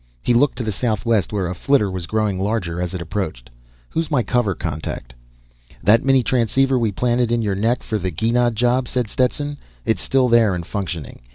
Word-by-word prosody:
He 120 - +2
looked 135 +3 +3
to 120 - -2
the 110 - -1
southwest 110 0 0
where 100 -4 -1
a 90 - -3
flitter 105 +1 +2
was 90 -2 -5
growing 105 -3 0
larger 95 -4 -1
as 90 0 -3
it 90 - -4
approached. 80 -10 -4 0.4
"Who's 165 0 -1
my 135 -6 +2
cover 105 -3 +1
contact?" 75 -6 -5 0.7
"That 105 +6 +5
mini 135 -1 +4
transceiver 130 +2 +2
we 115 -3 +1
planted 120 +2 +1
in 120 -1 +1
your 105 -2 0
neck 115 +6 0
for 110 - -2
the 95 0 -2
Gienah 115 +8 +1
job," 125 +2 +1
said 125 -1 -1
Stetson. 145 +5 -1 0.3
"It's 110 -4 0
still 130 -1 +2
there 115 -5 +4
and 85 -1 -5
functioning. 90 - -5
110 Hz, 195 wpm, -21 LUFS, 95-125 Hz, 0.7 s, That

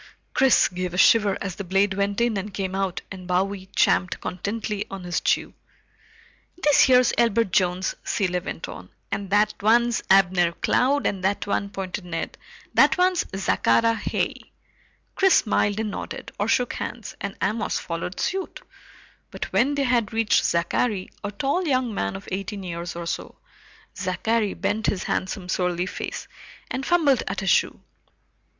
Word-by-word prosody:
Chris 265 -1 +5
gave 180 -1 -4
a - - -4
shiver 205 0 +5
as 195 -3 -4
the 200 - -4
blade 195 +2 +2
went 200 +1 -1
in 235 -2 +2
and 200 +1 -4
came 190 -2 -3
out 195 -2 -2
and 185 -2 -8
Bowie 190 +1 -1
champed 180 - +2
contentedly 205 +2 -3
on 195 -1 -7
his 175 0 -2
chew. - - 0 1.0
"This 295 -5 +4
here's 250 -1 +5
Elbert 230 -3 +2
Jones," 180 +1 +1
Cilley 180 -3 0
went 175 - -6
on, 90 0 -10 0.2
"and 200 -1 -3
that 210 +1 +3
one's 235 +2 +3
Abner 185 -3 +4
Cloud, 275 +10 +1
and 190 -3 -1
that 195 +2 0
one," 200 0 -1
pointed 195 -1 -5
Ned, 165 -2 -4 0.4
"that - - +5
one's 365 -1 +2
Zachary 195 - +3
Heigh." 225 - -3 0.6
Chris 385 -1 +4
smiled 205 -1 +2
and 220 -2 -2
nodded, - - -6
or 205 - 0
shook 245 +2 +1
hands, 235 -4 -6
and 200 0 -5
Amos 215 +1 -1
followed 170 +2 -5
suit, 385 0 -3 0.7
but - - -6
when 280 +4 +3
they 280 - +1
had 240 -4 +1
reached 225 -1 +2
Zachary, 185 +4 0
a 205 - -2
tall 280 - -1
young 255 -5 +1
man 100 - -2
of 195 - -9
eighteen 195 +1 -4
years 170 -1 -5
or 170 0 -5
so, 170 - -4 0.6
Zachary 210 +3 0
bent 220 +2 -1
his 190 - 0
handsome 185 0 -3
surly 180 -1 0
face 185 - -6 0.4
and 260 - -2
fumbled 305 -8 +3
at 195 - -2
his 195 - +2
shoe. - - +2
200 Hz, 160 wpm, -24 LUFS, 185-230 Hz, 1.0 s, Chris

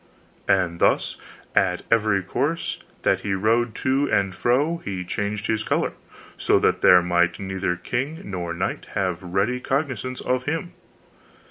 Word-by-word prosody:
And 90 -3 +2
thus - - +2 0.4
at 90 - +2
every 105 -4 +3
course 155 - -2 0.2
that - - +3
he 100 -1 -1
rode 115 +4 +1
to 135 +2 +2
and 100 -3 +2
fro 140 - +1
he 95 - -5
changed 105 +3 -3
his 110 -1 0
color, - - 0 0.4
so - - +3
that - - +2
there 90 -1 +7
might 85 -1 +2
neither 95 -2 -2
king 130 - -3
nor 90 -3 -4
knight 85 - -3
have 90 -3 -1
ready 95 +7 0
cognizance 130 -2 -2
of 125 0 -1
him. 165 +4 -2
105 Hz, 145 wpm, -24 LUFS, 90-130 Hz, 0.4 s, there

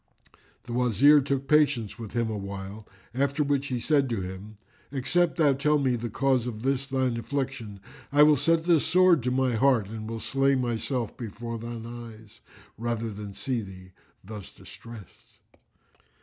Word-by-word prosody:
The 120 - -7
Wazir 125 +5 +5
took 135 0 -2
patience 140 -8 +2
with 110 -3 -8
him 120 -1 0
awhile, 100 +1 -6 0.3
after 140 +3 +1
which 140 -1 0
he 125 -3 -2
said 140 +1 +2
to 115 -5 -2
him, 95 +3 -8 0.3
"Except 165 +6 +1
thou 150 -4 +4
tell 150 +3 +2
me 130 -3 +1
the 120 0 -4
cause 130 +1 +1
of 110 -2 -6
this 135 0 0
thine 130 -3 0
affliction, 125 -4 -4 0.3
I 145 +1 +6
will 150 0 +6
set 160 +4 +2
this 165 -3 +3
sword 180 -2 +4
to 125 - -1
my 130 0 +1
heart 115 -3 +2
and 110 0 -6
will 115 0 -4
slay 135 +3 +1
myself 120 -1 -2
before 115 0 -6
thine 115 0 -6
eyes, 115 -2 -11 0.4
rather 115 -1 -2
than 100 -1 -8
see 125 -4 -2
thee 95 -2 -11 0.3
thus 105 0 -9
distressed." 115 -5 -14
120 Hz, 165 wpm, -27 LUFS, 110-140 Hz, 0.4 s, I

